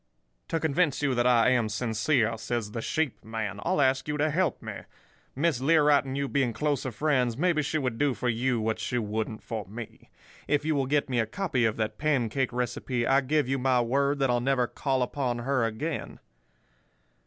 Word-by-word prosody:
"'To 165 - -1
convince 150 -2 +1
you 140 -2 +2
that 120 0 +2
I 120 0 +5
am 120 -4 +2
sincere,' 115 +2 +1
says 110 -1 -3
the 115 - -4
sheep 155 +2 -2
man, 110 -2 -4
'I'll - - 0
ask 135 0 +2
you 150 0 -1
to 150 +1 +1
help 170 -2 0
me. - - -7 0.6
Miss 145 -2 +1
Learight 150 -1 +4
and 135 0 -4
you 140 0 -1
being 135 -4 0
closer 140 +1 -1
friends, 125 -2 +1
maybe 170 0 +2
she 150 +2 -1
would 125 -6 -2
do 145 -3 +2
for 125 - -3
you 120 +1 +1
what 110 0 -1
she 125 - -2
wouldn't 110 0 -3
for 110 -4 -5
me. 110 +3 -10 0.4
If 145 0 +1
you 160 - +1
will 135 -3 0
get 145 +1 +1
me 125 -3 0
a 110 - +1
copy 135 - 0
of 110 -1 0
that 110 -1 -2
pancake 135 -4 0
recipe, 125 0 -2
I 135 +2 +4
give 145 +1 +1
you 135 +1 0
my 130 -1 +2
word 140 +4 +1
that 135 -2 +1
I'll 120 0 +1
never 130 -1 +2
call 130 +1 -1
upon 125 -1 -2
her 130 +1 0
again. 140 +9 -4
130 Hz, 200 wpm, -27 LUFS, 115-145 Hz, 0.6 s, I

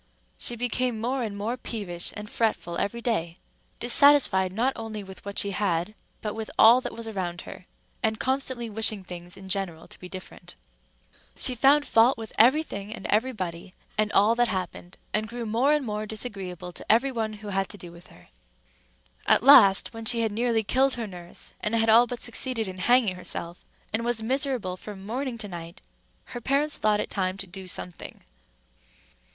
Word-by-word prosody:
She 240 - -2
became 245 0 -1
more 250 +4 -1
and 210 -4 -4
more 225 +5 -2
peevish 195 -8 -3
and 210 0 -7
fretful 215 -6 -1
every 235 +4 -2
day—dissatisfied 225 - +2
not 240 +7 0
only 220 -2 -6
with 190 -1 -11
what 200 0 -7
she 200 - +2
had, 180 -1 -1 0.3
but 210 -1 -3
with 220 0 -6
all 235 +3 +7
that - - -6
was 230 -1 -7
around 180 -5 -4
her, - - -10 0.4
and 220 0 0
constantly 260 -3 -1
wishing 215 -2 -1
things 175 -1 -7
in 190 - -11
general 190 -4 -3
to - - -12
be 180 - -10
different. 185 0 -10 0.8
She 255 - +2
found 280 +4 +4
fault 230 +4 +4
with 225 -1 -8
every 260 +8 +6
thing 200 -7 -7
and 215 - -7
everybody, 195 -6 -2 0.2
and 215 0 +1
all 210 +3 +4
that 240 +1 +2
happened, 180 -2 -5 0.2
and 215 +1 0
grew 235 0 -5
more 235 +6 +2
and 300 -3 +1
more 210 -1 -3
disagreeable 195 -5 -5
to 175 - -2
every 250 +5 +3
one 220 -3 -2
who 210 0 -9
had 195 -1 -1
to 205 - -8
do 175 -2 -10
with 170 +1 -15
her. 90 - -19 1.0
At - - +4
last, 240 -7 +7
when 225 0 -8
she 230 +1 +3
had 225 -2 0
nearly 230 +1 +1
killed 260 +5 +2
her 235 -2 -4
nurse, 175 -4 -7
and 210 +2 0
had 225 -1 +3
all 235 +2 +7
but 245 0 -6
succeeded 240 -2 +1
in 185 0 -7
hanging 240 -1 +3
herself, 175 -1 -3 0.3
and 225 +2 0
was 235 -2 0
miserable 255 -7 0
from 195 -1 -10
morning 250 +3 -3
to 215 -2 -6
night, 170 -1 -9 0.4
her 240 - -8
parents 285 +4 +1
thought 210 -1 +2
it - - -3
time 185 -1 -1
to 195 - -4
do 190 0 -9
something. 180 -1 -5
215 Hz, 185 wpm, -26 LUFS, 190-240 Hz, 1.0 s, all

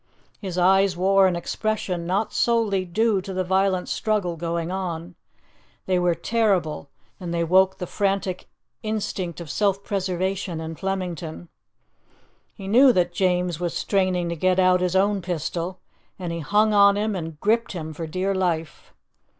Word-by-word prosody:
His 185 -3 -5
eyes 190 0 +4
wore 195 +1 +4
an 180 - 0
expression 180 -1 -2
not 200 +4 -1
solely 220 -5 +1
due 205 +3 +1
to 190 0 -7
the 185 - 0
violent 190 0 +1
struggle 210 -6 -1
going 170 +1 -3
on; 175 -2 -4 0.7
they 185 -1 +1
were 175 -1 +2
terrible, 180 -6 0 0.3
and 175 -3 -5
they 170 0 0
woke 190 +3 +3
the 180 - -4
frantic 195 -1 -2 0.3
instinct 205 -5 -3
of 170 - -7
self 200 +5 0
preservation 190 -3 -2
in 160 0 -5
Flemington. 175 -3 -4 1.1
He 195 -3 -8
knew 255 +6 +6
that 175 -3 +1
James 180 -2 0
was 175 -1 -2
straining 185 -3 0
to 170 - -2
get 185 +3 +1
out 185 -1 +4
his 180 0 0
own 200 +1 +2
pistol, 175 +1 -3 0.4
and 175 -3 -4
he 170 - -4
hung 210 +7 +2
on 200 0 +6
him 210 0 -1
and 165 -4 -6
gripped 225 +4 +1
him 160 -3 -5
for 160 +1 -6
dear 185 +5 -1
life. 170 -4 -3
185 Hz, 160 wpm, -24 LUFS, 170-195 Hz, 1.1 s, knew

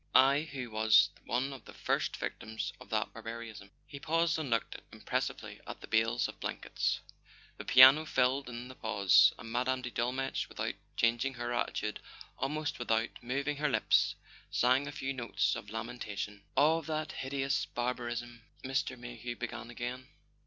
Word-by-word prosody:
I, 140 +4 +5
who 125 -4 -5
was 110 0 +5
one 130 +3 -1
of 135 - -11
the - - -12
first - - -1
Victims 110 0 -4
of - - -12
that - - -1
barbarism.. 115 -3 -8
." - - -40
He 140 - -9
paused 165 +2 +1
and 150 -4 -3
looked 115 -1 0 0.2
impressively - - -3
at - - -7
the - - -9
bales 115 +2 +2
of - - -10
blankets. - - -2 0.6
The - - -7
piano 130 +5 +9
filled 130 0 +1
in 120 +1 -6
the 130 - -9
pause, 105 -6 +5
and 115 - -9
Mme. 130 +2 0
de 125 - -4
Dolmetsch, 130 +3 -1
without - - -3 0.2
changing 120 +3 +2
her 120 0 -3
attitude, 120 - -2 0.4
almost 150 +1 -2
with¬ 120 - -5
out 115 +1 +2
moving 140 +4 -2
her 150 +1 +1
lips, 125 - +3 0.3
sang 130 +3 +3
a - - -4
few 135 -1 -3
notes 120 -3 0
of 105 - -7
lamentation. 110 -2 -5 0.2
"Of 160 +1 +4
that 155 -1 -2
hideous 135 +1 -1
barbarism 120 -1 -3
" - - -29
Mr. 130 -1 -1
Mayhew 120 0 -6
began 120 -1 -6
again. 125 +2 -5
125 Hz, 165 wpm, -32 LUFS, 115-135 Hz, 0.6 s, piano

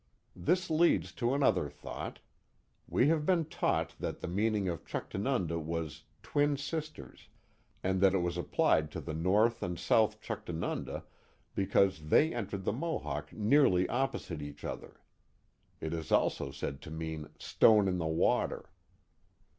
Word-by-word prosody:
This 175 - 0
leads 155 - +3
to 120 +6 0
another 100 - +2
thought. 75 - -7 0.7
We 135 - +3
have 160 -2 +2
been 170 0 +2
taught 160 - -1
that - - -4
the - - -5
meaning 105 +2 0
of 85 -3 -3
Chuctanunda 95 - -2
was 80 0 -4 0.2
twin 145 0 +1
sisters 150 - -6 0.2
" - - -38
and 95 0 +1
that 95 -1 +5
it 90 - +1
was 85 -1 -1
applied 80 -3 +2
to - - -4
the 80 - -5
north 105 +8 +2
and 90 -1 -3
south 110 +2 +2
Chuctanunda 100 -8 -4 0.5
because 95 -5 +2
they 155 - +5
entered 100 -4 -4
the - - +1
Mohawk 75 - -3
nearly 105 -5 +4
oppo 130 0 0
site 80 -4 -7
each 75 0 -8
other. - - -7 0.8
It 80 +1 -4
is 80 -2 -5
also 70 - +2
said 70 0 -5
to - - -9
mean 80 -1 -5
stone 105 -3 +4
in 90 -1 0
the 80 - -1
water. 80 +1 0
95 Hz, 150 wpm, -32 LUFS, 80-120 Hz, 0.8 s, that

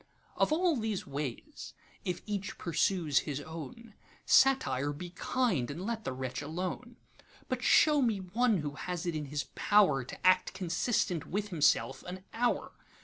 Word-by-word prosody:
Of - - +2
all 340 +1 +3
these 220 -4 -2
ways, 140 -3 -6 0.3
if 180 -1 -3
each 205 -2 -4
pursues 165 -3 +1
his 145 -2 -4
own, 165 - -9 0.3
Satire, 145 - +4
be 175 +4 -8
kind, 185 - 0
and 165 +7 -5
let 225 -1 -3
the - - -1
wretch 130 0 -4
alone; 185 +10 -5 0.5
But - - -2
show 300 -2 +5
me 230 -5 +2
one 210 +4 +1
who 145 -1 -3
has 180 +3 -4
it 170 - -1
in 150 -1 -3
his 145 +1 -3
powerTo 150 -12 +3
act 185 +1 +4
consistent 180 - 0
with 205 +3 -2
himself 150 -5 +2
an 185 +1 -7
hour. 240 +1 0
180 Hz, 150 wpm, -31 LUFS, 150-220 Hz, 0.5 s, show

